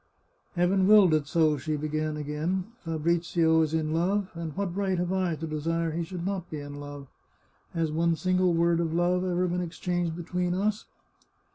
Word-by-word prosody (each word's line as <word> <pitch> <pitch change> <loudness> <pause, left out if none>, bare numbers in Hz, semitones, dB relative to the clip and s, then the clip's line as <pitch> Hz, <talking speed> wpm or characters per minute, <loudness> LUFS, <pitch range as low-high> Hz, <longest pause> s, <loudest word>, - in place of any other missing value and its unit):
" - - -40
Heaven 185 +2 +3
willed 205 -5 +7
it 150 -2 +1
so," 155 -2 +3
she 155 +4 -2
began 155 +1 -2
again. 150 +5 -2
" 240 - -33
Fabrizio 165 0 +2
is 155 -1 +1
in 155 -1 0
love, 185 +4 0
and 165 -2 -5
what 195 -3 -2
right 195 -2 0
have 180 +1 -1
I 185 -3 0
to 160 - -5
desire 165 +2 -1
he 170 +2 -2
should 175 0 -6
not 190 -3 -3
be 155 - -5
in 145 0 -8
love? 145 -1 -8 0.7
Has 165 -2 0
one 165 +1 +2
single 185 +2 +2
word 170 0 +3
of 165 -1 -1
love 180 +1 +2
ever 180 0 0
been 180 +1 -1
exchanged 175 -1 -2
between 180 +1 -2
us 210 +2 -1
170 Hz, 190 wpm, -28 LUFS, 155-180 Hz, 0.7 s, willed